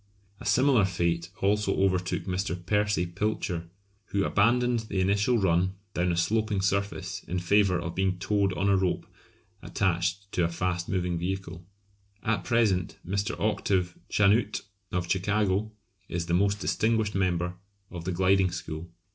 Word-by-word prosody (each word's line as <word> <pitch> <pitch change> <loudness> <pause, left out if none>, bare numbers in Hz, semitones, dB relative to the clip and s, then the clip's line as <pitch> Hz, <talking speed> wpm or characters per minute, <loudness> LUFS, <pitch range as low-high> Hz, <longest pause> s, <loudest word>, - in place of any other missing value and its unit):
A - - -10
similar 125 +1 +4
fate 85 -2 -1
also 100 0 +2
overtook 95 -1 +1
Mr. 95 -1 -2
Percy 105 -2 +1
Pilcher, 90 -2 -2 0.4
who 100 -2 0
abandoned 120 +3 +3
the 100 - -1
initial 100 +6 +2
run 95 -1 +2 0.2
down 90 0 +1
a 85 - -1
sloping 105 +4 +1
surface 95 -1 -1
in 90 - -2
favour 95 +1 +3
of 85 0 -4
being 95 0 0
towed 100 +1 +1
on 95 +2 0
a 100 - +4
rope 95 -2 0 0.6
attached 95 +1 -1
to 90 - +1
a - - +3
fast 90 +1 -2
moving 90 -2 -1
vehicle. 90 -1 -4 0.6
At 115 - 0
present 110 -7 +1
Mr. 100 +3 -2
Octave 95 -4 0
Chanute, 105 +2 +2 0.3
of 90 -1 -1
Chicago, 100 +2 +1 0.4
is 85 0 -2
the 85 - -2
most 100 +3 +2
distinguished 110 -1 +1
member 90 -2 0 0.4
of 85 -2 -6
the 95 - -1
"gliding" 95 +1 +3
school. 85 -2 -6
95 Hz, 145 wpm, -28 LUFS, 90-100 Hz, 0.6 s, similar